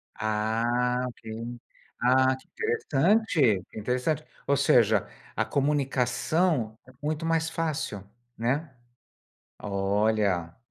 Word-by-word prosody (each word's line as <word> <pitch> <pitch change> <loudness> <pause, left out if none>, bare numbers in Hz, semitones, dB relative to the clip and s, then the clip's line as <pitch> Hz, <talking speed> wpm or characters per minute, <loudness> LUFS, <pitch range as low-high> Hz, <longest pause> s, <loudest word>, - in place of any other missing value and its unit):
Ah, 115 +3 0
Ok. 120 - -12 0.8
Ah, 130 +1 +4
que 130 - -20
interessante! 175 - +2
Interessante. 125 +8 -1 0.2
Ou 140 - +4
seja, 110 -6 +4 0.3
a - - +2
comunicação 135 -1 +1
é 130 - -15
muito 155 +2 -2
mais 165 0 +1
fácil. 155 - -3 0.3
Né. 135 +5 -1 0.8
Olha. 100 -3 0
125 Hz, 90 wpm, -27 LUFS, 110-155 Hz, 0.8 s, Ah